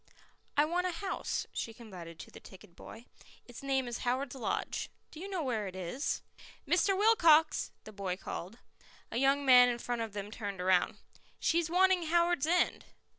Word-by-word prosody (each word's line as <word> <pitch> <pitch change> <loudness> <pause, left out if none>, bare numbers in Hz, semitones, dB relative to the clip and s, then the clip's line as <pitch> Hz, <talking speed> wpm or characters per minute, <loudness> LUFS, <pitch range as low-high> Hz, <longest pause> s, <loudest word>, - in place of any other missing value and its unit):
"I 295 - +5
want 355 +3 0
a - - -1
house," 385 +3 -3
she 225 - -4
confided 180 -8 -10
to - - -11
the - - -12
ticket 185 -2 -15
boy. 230 +6 -12 0.4
"Its 245 - -11
name 270 -2 0
is 240 - -4
Howards 255 +2 -1
Lodge. 260 - -3 0.2
Do 310 - -11
you 390 +3 -6
know 370 -5 -2
where 225 -6 -1
it 185 - -8
is?" 185 - -3 0.4
"Mr. 380 +2 +3
Wilcox!" 335 -8 +4
the 215 - -11
boy 190 -2 -3
called. 195 +2 -7 0.5
A 230 - -2
young 275 +2 +2
man 250 -1 +8
in 240 - -1
front 240 0 -3
of 225 -2 -4
them 205 0 -5
turned 205 -4 -5
round. 180 0 +2 0.4
"She's 335 0 +1
wanting 365 -1 +3
Howards 340 -2 +2
End." 355 +2 +1
255 Hz, 175 wpm, -32 LUFS, 210-335 Hz, 0.5 s, man